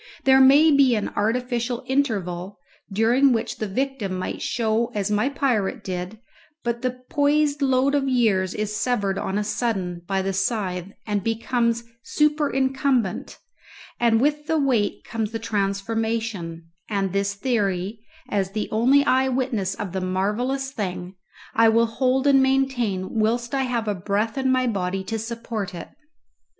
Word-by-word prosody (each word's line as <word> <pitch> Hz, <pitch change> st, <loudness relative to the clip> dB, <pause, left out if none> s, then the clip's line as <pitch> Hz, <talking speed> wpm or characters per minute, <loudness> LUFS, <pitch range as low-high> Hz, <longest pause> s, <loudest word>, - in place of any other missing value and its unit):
There 265 Hz, 0 st, +6 dB
may 285 Hz, +4 st, +7 dB
be 275 Hz, -4 st, +5 dB
an 210 Hz, -, -1 dB
artificial 240 Hz, +3 st, -1 dB
interval, 200 Hz, -9 st, -1 dB, 0.3 s
during 240 Hz, +6 st, +4 dB
which 230 Hz, 0 st, -2 dB
the 215 Hz, -, -3 dB
victim 235 Hz, -3 st, -2 dB
might 185 Hz, -, -4 dB
show 230 Hz, 0 st, 0 dB
as 205 Hz, 0 st, -1 dB
my 210 Hz, +6 st, +2 dB
pirate 250 Hz, -8 st, -1 dB
did, 185 Hz, +3 st, -5 dB, 0.5 s
but 235 Hz, 0 st, -2 dB
the 255 Hz, 0 st, -3 dB
poised 290 Hz, 0 st, +2 dB
load 265 Hz, 0 st, +2 dB
of 275 Hz, -2 st, +1 dB
years 210 Hz, -7 st, +2 dB
is 210 Hz, 0 st, -2 dB
severed 205 Hz, -5 st, 0 dB
on 190 Hz, -, -2 dB
a 210 Hz, -, 0 dB
sudden 195 Hz, -6 st, -2 dB
by 195 Hz, -1 st, 0 dB
the 195 Hz, 0 st, -1 dB
scythe 195 Hz, -2 st, -2 dB
and 205 Hz, -3 st, -1 dB
becomes 235 Hz, +1 st, 0 dB, 0.2 s
superincumbent, 270 Hz, -7 st, 0 dB, 0.6 s
and 230 Hz, -2 st, +3 dB
with 295 Hz, +3 st, 0 dB
the 320 Hz, -1 st, +1 dB
weight 255 Hz, -8 st, +1 dB
comes 220 Hz, -2 st, -3 dB
the -, -, -1 dB
transformation; 205 Hz, -4 st, -2 dB, 0.2 s
and 195 Hz, -3 st, -1 dB
this 200 Hz, 0 st, 0 dB
theory, 200 Hz, -3 st, -1 dB, 0.3 s
as 195 Hz, -2 st, -1 dB
the 215 Hz, 0 st, -2 dB
only 260 Hz, +6 st, +4 dB
eye 260 Hz, 0 st, +3 dB
witness 245 Hz, -7 st, -1 dB
of 200 Hz, -3 st, -5 dB
the 190 Hz, +1 st, -3 dB
marvellous 215 Hz, +9 st, -1 dB
thing, 185 Hz, -5 st, -4 dB, 0.4 s
I 225 Hz, 0 st, +5 dB
will 230 Hz, +1 st, +4 dB
hold 255 Hz, +3 st, 0 dB
and 275 Hz, -1 st, +5 dB
maintain 245 Hz, -7 st, 0 dB
whilst 235 Hz, +3 st, 0 dB
I 270 Hz, -1 st, +1 dB
have 220 Hz, -7 st, -2 dB
breath 210 Hz, +3 st, 0 dB
in 265 Hz, -1 st, +1 dB
my 255 Hz, 0 st, +2 dB
body 190 Hz, -4 st, -1 dB
to 225 Hz, +3 st, -3 dB
support 225 Hz, -4 st, -5 dB
it. 170 Hz, -, -8 dB
225 Hz, 150 wpm, -23 LUFS, 200-260 Hz, 0.6 s, may